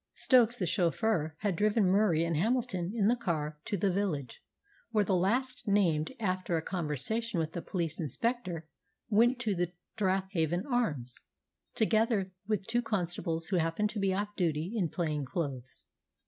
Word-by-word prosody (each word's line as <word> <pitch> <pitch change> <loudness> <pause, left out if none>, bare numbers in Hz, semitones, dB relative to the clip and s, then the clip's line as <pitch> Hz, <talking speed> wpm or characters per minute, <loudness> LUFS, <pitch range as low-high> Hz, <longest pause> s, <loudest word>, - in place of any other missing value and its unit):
Stokes 245 -2 +4
the 185 - -1
chauffeur 170 -2 +1
had 200 -3 0
driven 210 +2 +3
Murie 190 -5 +3
and 170 -1 0
Hamilton 205 -1 0
in 205 -3 +3
the 240 - +4
car 165 -10 -1
down 150 - -27
to 205 - -1
the 195 +1 +2
village, 160 - -2 0.5
where 215 -3 +2
the 190 -1 +1
last 245 +8 0
named, 170 -7 +2
after 185 -4 0
a - - -1
conversation 180 - -1
with 160 -1 -1
the 170 - -4
police 170 -3 -3
inspector, 175 - -2 0.4
went 235 +4 +4
to 220 -4 +1
the 175 -1 -1 0.2
"Strathavon 190 -4 0
Arms," 155 - -1 0.6
together 220 -3 +2 0.2
with 210 -3 0
two 240 +3 +1
constables 175 -6 -2
who 190 - +2
happened 165 +6 0
to 215 - -4
be 195 -1 +2
off 205 +2 -1
duty, 165 +1 -1
in 185 -7 +1
plain 155 -4 -1
clothes. 135 -4 -5
190 Hz, 160 wpm, -31 LUFS, 165-215 Hz, 0.6 s, Stokes